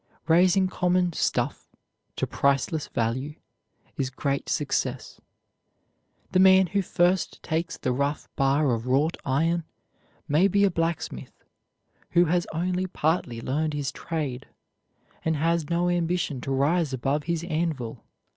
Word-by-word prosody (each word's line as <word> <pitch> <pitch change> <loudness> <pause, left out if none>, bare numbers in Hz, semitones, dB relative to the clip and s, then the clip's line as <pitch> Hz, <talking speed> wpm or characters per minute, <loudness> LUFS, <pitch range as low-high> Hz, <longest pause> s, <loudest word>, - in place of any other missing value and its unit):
Raising 180 +3 +4
common 180 -1 +1
"stuff" - - -1 0.5
to - - -1
priceless 140 +2 0
value 130 +6 -2 0.6
is 135 -2 -1
great 140 +1 -2
success. - - -2 1.1
The 185 - +3
man 190 0 +7
who 200 +3 0
first 180 0 0
takes 165 +2 -2
the 130 - -1
rough 140 +4 -1
bar 135 0 +2
of 115 +1 -3
wrought 145 +6 +2
iron 165 +5 +1 0.6
may 155 +7 +4
be 200 +1 +2
a 200 - +4
blacksmith, 165 0 -3 0.7
who 175 0 +5
has 175 +1 +1
only 180 +3 -1
partly 155 -9 -1
learned 150 +5 -1
his 145 -2 -2
trade, 145 -6 -4 0.8
and 160 0 +1
has 165 +1 0
no 175 +1 +1
ambition 175 -5 0
to 135 - -4
rise 145 +3 +1
above 135 +3 -1
his 170 0 -1
anvil. 155 -9 -3
160 Hz, 130 wpm, -26 LUFS, 140-175 Hz, 1.1 s, man